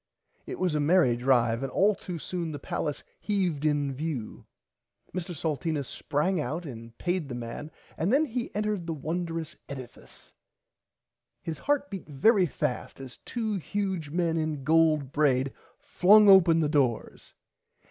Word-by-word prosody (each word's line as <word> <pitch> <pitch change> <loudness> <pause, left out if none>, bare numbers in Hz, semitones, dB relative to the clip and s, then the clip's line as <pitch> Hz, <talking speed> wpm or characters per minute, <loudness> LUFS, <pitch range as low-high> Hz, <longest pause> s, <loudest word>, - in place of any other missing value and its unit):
It - - -5
was 180 -3 0
a 150 - +1
merry 150 -4 +4
drive 120 -2 +2
and 135 -1 -3
all 205 +2 +3
too 180 -3 -7
soon 170 0 -4
the - - -4
Palace 145 +1 -3 0.2
heaved 180 -8 -1
in 145 -2 +1
view. 135 -5 -5 0.7
Mr 175 -1 -4
Salteena 155 -1 -2
sprang 155 +7 -1
out 165 +4 -4
and 115 -4 -9
paid 175 -4 -2
the 125 - -4
man 120 +5 -6 0.3
and 170 +6 +1
then 290 +5 +4
he 245 -3 -3
entered 210 -4 -1
the 165 - -2
wondrous 165 +1 -4
edifice. 130 -3 -11 1.1
His 160 -2 -5
heart 285 -2 0
beat 190 -5 -7
very 185 - +4
fast 145 -4 -3
as 130 -2 -9
two 220 -4 -3
huge 190 -4 -3
men 165 +1 0
in 155 -3 -2
gold 155 -2 +3
braid 135 -3 +2 0.2
flung 210 +3 +5
open 175 -4 +7
the 155 - +2
doors. 135 -7 -1
160 Hz, 150 wpm, -28 LUFS, 140-185 Hz, 1.1 s, open